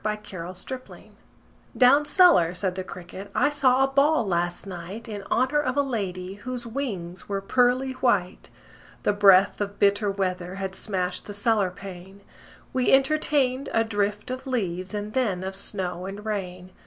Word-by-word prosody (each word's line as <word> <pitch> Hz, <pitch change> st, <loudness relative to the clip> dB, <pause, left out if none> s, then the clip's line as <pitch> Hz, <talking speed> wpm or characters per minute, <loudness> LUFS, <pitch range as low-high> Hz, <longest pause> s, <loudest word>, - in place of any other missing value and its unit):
The 210 Hz, 0 st, -1 dB
Potato's 185 Hz, -3 st, -8 dB
Dance 260 Hz, -1 st, -9 dB, 0.7 s
"Down 275 Hz, +4 st, +6 dB
cellar," 295 Hz, -, +5 dB
said 185 Hz, 0 st, -1 dB
the 185 Hz, 0 st, -4 dB
cricket, 185 Hz, +2 st, -9 dB
"I 290 Hz, -, +3 dB
saw 270 Hz, -2 st, +3 dB
a -, -, +3 dB
ball 275 Hz, -1 st, +3 dB
last 175 Hz, -1 st, -1 dB
night 190 Hz, +5 st, -7 dB
In 205 Hz, -3 st, -6 dB
honor 260 Hz, +4 st, +2 dB
of 260 Hz, -2 st, -2 dB
a 285 Hz, -, +4 dB
lady 190 Hz, -8 st, -4 dB
Whose 250 Hz, 0 st, -5 dB
wings 205 Hz, -9 st, -5 dB
were 200 Hz, -1 st, -1 dB
pearly 250 Hz, +5 st, +2 dB
white. 205 Hz, -8 st, 0 dB, 0.5 s
The -, -, +2 dB
breath 200 Hz, -1 st, +5 dB
of 200 Hz, 0 st, -3 dB
bitter 205 Hz, +1 st, +3 dB
weather 185 Hz, -2 st, -2 dB
Had 190 Hz, -1 st, -4 dB
smashed 185 Hz, -3 st, -2 dB
the 205 Hz, -, -6 dB
cellar 205 Hz, -2 st, +2 dB
pane: 190 Hz, 0 st, -11 dB, 0.5 s
We 255 Hz, -1 st, +2 dB
entertained 275 Hz, -1 st, +2 dB
a 225 Hz, -, +3 dB
drift 210 Hz, 0 st, -2 dB
of 260 Hz, +1 st, -6 dB
leaves 190 Hz, -6 st, -2 dB
And 210 Hz, +1 st, -4 dB
then 205 Hz, -8 st, 0 dB
of 190 Hz, +1 st, -4 dB
snow 185 Hz, -2 st, -3 dB
and 200 Hz, +2 st, -8 dB
rain. 185 Hz, -3 st, -4 dB
205 Hz, 165 wpm, -25 LUFS, 185-255 Hz, 0.7 s, Down